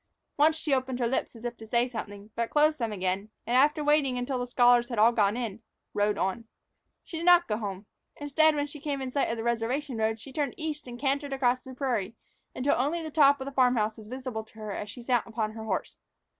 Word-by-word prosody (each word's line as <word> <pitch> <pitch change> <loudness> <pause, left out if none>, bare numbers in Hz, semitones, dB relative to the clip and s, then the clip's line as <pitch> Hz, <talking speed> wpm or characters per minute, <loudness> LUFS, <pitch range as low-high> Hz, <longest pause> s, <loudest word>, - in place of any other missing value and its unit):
Once 305 +2 +4
she 310 -2 -1
opened 260 -1 0
her 245 - 0
lips 245 +1 -1
as 230 +1 -11
if 240 0 -3
to 220 -1 -12
say 235 +2 +2
something, 210 -3 -7
but 230 0 -2
closed 305 0 +3
them 230 -2 -1
again, 190 +1 -2 0.2
and, 240 - 0
after 295 +3 +4
waiting 290 -4 +3
until 250 +1 -2
the 245 - -3
scholars 245 -1 +4
had 235 - -4
all 220 +3 +6
gone 210 -1 +2
in, 230 -3 -4 0.3
rode 205 0 +1
on. 195 +5 -1 0.6
She 330 - -7
did 335 - -4
not 350 -1 +7
go 210 - -1
home; 200 -2 -5 0.3
instead, 305 +2 +3
when 290 -1 0
she 295 +1 -10
came 285 -2 -3
in 260 -1 -4
sight 280 - +1
of 230 - -2
the 225 - -4
reservation 235 +3 -1
road, 220 0 0
she 260 +5 -11
turned 285 -3 -1
east 305 -3 -4
and 240 -1 -7
cantered 280 +1 -1
across 255 -2 +2
the 260 0 -11
prairie 235 -6 -1 0.4
until 265 +3 +2
only 315 +6 0
the 315 - -6
top 285 -2 +5
of 265 - -5
the 275 - -5
farm 255 -2 +3
house 215 -1 0
was 215 - -12
visible 255 -2 -5
to 220 - -21
her 215 -1 -6
as 205 +1 -5
she 235 +4 -9
sat 245 -1 +1
upon 220 -2 -2
her 220 0 -8
horse. 195 -4 -3
245 Hz, 245 wpm, -28 LUFS, 220-280 Hz, 0.6 s, not